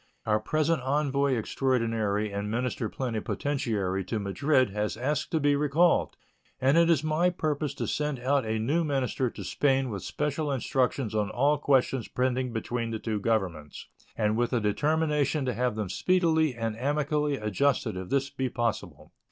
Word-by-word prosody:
Our 110 -1 +2
present 155 +6 0
envoy 140 0 +1
extraordinary 115 -4 0
and 100 +1 -3
minister 120 0 -2
plenipotentiary 110 -5 -2
to 110 - -2
Madrid 130 +5 +1
has 105 +2 -2
asked 140 +4 -1
to 160 - 0
be 145 -1 +3
recalled, 150 +4 +2 0.4
and 135 +2 +3
it 170 0 +5
is 160 -3 +3
my 155 +3 +2
purpose 155 -4 -2
to - - -3
send 150 -2 -1
out 135 +2 +1
a 110 0 -1
new 145 +10 +1
minister 135 -3 0
to - - -9
Spain 135 -3 +1
with 100 -3 -4
special 150 - -2
instructions 130 -3 0
on 105 -2 0
all 145 +3 +2
questions 135 -4 +2
pending 130 0 -1
between 115 +1 -3
the 115 - -2
two 110 -1 -3
Governments, 95 -9 -2 0.3
and 105 0 +1
with 120 +1 0
a 120 - +3
determination 150 +5 +1
to 125 - 0
have 125 0 0
them 105 -2 -2
speedily 160 - +2
and 115 -2 -2
amicably 145 +2 0
adjusted 110 +2 0
if 95 -1 -6
this 140 0 0
be 130 -2 -2
possible. 120 -2 -3
130 Hz, 165 wpm, -28 LUFS, 110-145 Hz, 0.4 s, it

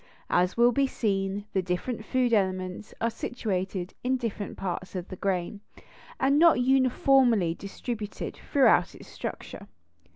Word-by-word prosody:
As 180 +3 +2
will 240 +1 +6
be 275 +3 +2
seen, 200 -4 -1
the 190 - +2
different 185 +6 -3
food 250 0 +1
elements 185 -1 -1
are 230 +1 0
situated 190 -6 -3
in 260 +1 +1
different 220 -4 -5
parts 185 0 -4
of 180 0 -5
the 185 - -6
grain, 190 +1 -2 0.6
and 275 +2 +3
not 335 -5 +6
uniformly 255 -6 +3
distributed 210 +3 -6
throughout 240 - +4
its - - -13
structure. - - -7
210 Hz, 135 wpm, -27 LUFS, 185-250 Hz, 0.6 s, will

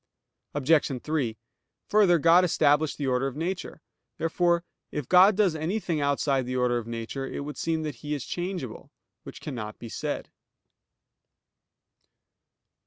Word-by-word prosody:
Obj. 145 -2 +2
3: 140 -8 -1 0.5
Further, 200 -5 +5
God 170 +3 +6
established 150 -4 +2
the 145 - -2
order 130 0 +1
of 135 - -5
nature. 170 0 -4 0.3
Therefore 170 +1 +1 0.3
it 150 -4 -4
God 185 +3 +7
does 195 -6 +3
anything 165 0 -1
outside 140 -2 +1
the 130 - -3
order 125 -1 +2
of 115 - -9
nature, 115 +4 -4
it - - -5
would 145 +1 -6
seem 160 -1 -1
that 150 -5 -4
He 150 0 -2
is 140 - -5
changeable; 175 - -5 0.3
which - - -11
cannot 110 -7 -6
be 115 - -9
said. - - -4
150 Hz, 140 wpm, -27 LUFS, 130-170 Hz, 0.5 s, God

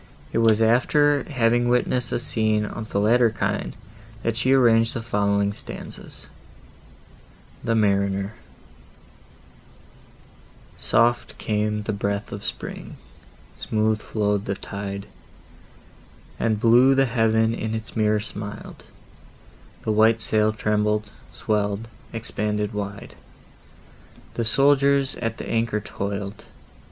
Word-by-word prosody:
It - - +2
was 115 -1 +4
after 140 +5 +3
having 120 -3 +2
witnessed 125 0 +1
a - - +1
scene 110 -3 0
of 110 +1 -6
the 100 - 0
latter 115 +3 +4
kind, 110 - -2 0.5
that 115 -1 0
she 125 +3 +1
arranged 115 -4 +4
the 115 - -2
following 100 -2 +1
stanzas: - - -9 1.4
THE 115 - +1
MARINER 100 -1 +1 2.4
Soft 120 +1 +2
came 105 -1 -1
the 110 - -2
breath 100 0 -2
of 100 0 -6
spring; - - -6 0.6
smooth 110 0 0
flow'd 105 -1 -1
the 100 - -2
tide; 100 0 -6 1.3
And 110 -2 +1
blue 120 +4 +5
the 135 0 +4
heaven 115 -2 +2
in 110 -1 -3
its 110 0 -7
mirror 105 -1 +2
smil'd; 105 -1 -7 1.0
The 110 - 0
white 110 +1 +4
sail 110 0 +2
trembled, 105 -1 0 0.2
swell'd, 105 0 -1 0.2
expanded 105 -2 -2
wide, 100 -1 -5 1.2
The - - -20
busy 115 - 0
sailors 140 0 +3
at 115 -2 -3
the - - -7
anchor 115 -2 0
toil'd. 100 0 -5
110 Hz, 115 wpm, -23 LUFS, 105-115 Hz, 2.4 s, blue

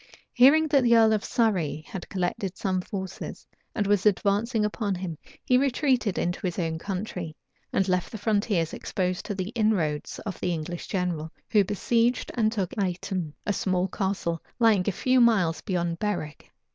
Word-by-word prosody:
Hearing 295 +6 +6
that 280 -1 +4
the 235 -2 +5
earl 220 -1 +5
of 210 - 0
Surrey 180 -10 0
had 190 - -7
collected 185 0 -2
some 185 -2 0
forces, 190 0 -6 0.3
and 210 - 0
was 205 0 +3
advancing 210 +3 +2
upon 210 -2 -1
him, 180 -2 -4 0.3
he 250 0 +4
retreated 255 - +1
into 175 +1 -1
his 180 -3 -2
own 165 -3 -1
country, 180 -4 -4 0.4
and 195 - +1
left 180 -1 0
the 220 - -5
frontiers 205 -5 0
exposed 185 -1 -2
to 205 - -3
the 185 0 -3
inroads 210 -10 0
of 200 - -5
the 180 - 0
English 170 +1 -5
general, 175 -5 -2 0.2
who 210 -2 +5
besieged 230 +5 +1
and 220 -3 +2
took 195 -6 -2
Aiton, 180 -3 -2
a 205 - +1
small 185 -1 0
castle 190 -4 -2 0.2
lying 220 -6 +4
a - - +3
few 255 +6 +2
miles 195 -9 +3
beyond 175 -4 -2
Berwick. 175 -8 -3
195 Hz, 170 wpm, -26 LUFS, 180-220 Hz, 0.4 s, Hearing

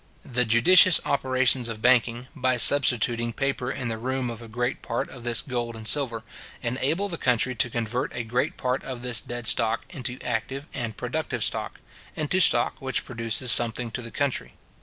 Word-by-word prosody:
The 125 0 0
judicious 165 +11 +6
operations 130 -2 +1
of 110 -1 -6
banking, 120 0 +2
by 130 -3 +1
substituting 120 -3 +3
paper 135 -1 -2
in 130 -2 -3
the 115 -1 -4
room 130 0 -2
of 115 0 -9
a 115 - -10
great 120 +3 -3
part - - -3
of 125 - -11
this 120 -1 +1
gold 120 -3 -4
and 110 -1 -7
silver, 120 -6 +1 0.4
enable 135 +11 -1
the 170 -4 -5
country 125 +1 +1
to 120 0 0
convert 120 +3 -2
a 120 - -3
great 120 +3 -1
part 125 +1 -1
of 125 -2 -7
this 125 -1 0
dead 120 -1 -6
stock 115 +1 +1
into 130 -6 -3
active 125 +4 -3
and 120 -4 -4
productive - - -3
stock; - - -2 0.4
into 155 +4 0
stock 120 -8 +3
which 130 0 -1
produces 115 0 0
something 120 0 +3
to 120 - -4
the 115 - -8
country. 140 +3 -2
125 Hz, 180 wpm, -25 LUFS, 115-130 Hz, 0.4 s, judicious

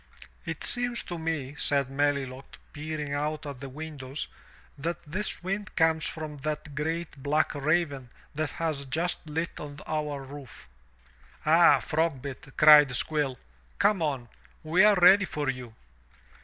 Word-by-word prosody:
*lt - - -4
seems 245 -1 0
to 175 -1 -6
me," 160 -4 -3
said 140 -2 +1
Melilot, 135 -2 -1 0.2
peering 150 -1 -4
out 150 +1 -2
at 140 -3 -6
the 135 0 -7
windows, 145 -1 -6 0.5
that 165 +4 -3
this 185 +5 -3
wind 200 +3 -3
comes 160 -1 +3
from 155 -2 -5
that 150 0 -4
great 160 0 -3
black 150 +3 +1
raven 145 -3 0 0.2
that 155 0 -1
has 155 -4 -2
just 160 +3 -2
lit 165 +3 -3
on 145 -1 -8
our 150 -3 -3
roof." 135 -2 -11 0.8
"Ah, - - +6
Frogbit," 140 -4 -2
cried 150 -4 +8
Squill, 145 -3 0 0.4
"come 205 -4 +3
on! 135 -6 -1 0.4
We 165 +5 +4
are 210 -1 +7
ready 190 +2 +7
for 145 -6 -1
you." 125 -3 -10
150 Hz, 140 wpm, -28 LUFS, 140-160 Hz, 0.8 s, cried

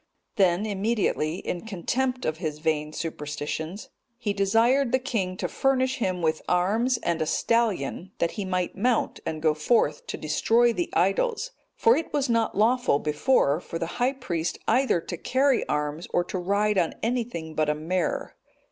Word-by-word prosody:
Then 190 0 +3
immediately, 205 -6 0
in 175 -1 -4
contempt 250 +6 -1
of 155 0 -1
his 155 -3 -3
vain 150 -1 -1
superstitions, 155 +3 -5 0.3
he 215 -4 -2
desired 230 +7 +3
the 260 - +4
king 220 -9 -2
to - - -2
furnish 260 0 +1
him 185 -7 -1
with 160 -1 +1
arms 215 +8 +2
and 170 -1 0
a 155 - 0
stallion, 195 -7 0
that 170 - 0
he 205 - -4
might 185 -2 -2
mount 235 +4 0
and 155 0 -4
go 155 -1 +4
forth 155 -1 +1
to - - -4
destroy 230 +10 +2
the 175 -5 -2
idols; 455 - +1 0.2
for 460 - +5
it 325 - -3
was 280 -3 0
not 230 -3 +1
lawful 240 - +3
before 150 - +2
for 165 - -5
the 165 - -2 0.2
high 255 +2 +3
priest 175 -11 -3
either 255 -9 +3
to 175 - -6
carry 265 +4 +1
arms, 150 +2 -2
or 175 - +2
to 185 +1 -4
ride 200 +2 +1
on 170 - 0
anything 230 -9 -2
but 155 -1 +1
a 150 - +1
mare. 170 +4 -2
190 Hz, 170 wpm, -26 LUFS, 160-240 Hz, 0.3 s, for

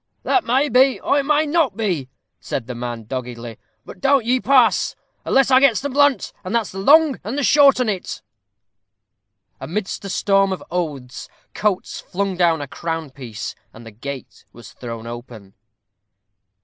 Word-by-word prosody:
"That 380 - +2
may 265 +5 +2
be, 260 +1 +4
or 285 - +1
it 275 - -2
may 300 +1 +3
not 295 - +1
be," 175 - -2 0.3
said 125 - -4
the 125 - -6
man, 120 -1 -5
doggedly. 120 -1 -6 0.3
"But - - -11
you - - -25 0.4
don't - - -12
pass, 255 -3 +3 0.3
unless 270 0 +3
I 260 - +7
gets 265 -5 +4
the 285 - -3
blunt, 285 0 +2
and 185 +5 -3
that's 230 -3 0
the 195 - -7
long 290 +5 +5
and 260 +8 -2
short 280 -3 +6
on 250 - +1
it." 190 - -4 1.4
Amidst 195 +5 -4
a 195 - -6
storm 195 0 +2
of 190 - -4
oaths, 145 -8 -4 0.2
Coates 205 -3 -1
flung 195 0 -3
down 170 -3 +2
a 145 - -5
crown 165 0 -5
piece, 120 -6 -7 0.2
and 115 - -13
the 115 - -10
gate 130 +4 -8
was 115 -3 -13
thrown 115 -2 -8
open. 120 -4 -10
190 Hz, 165 wpm, -20 LUFS, -, 1.4 s, I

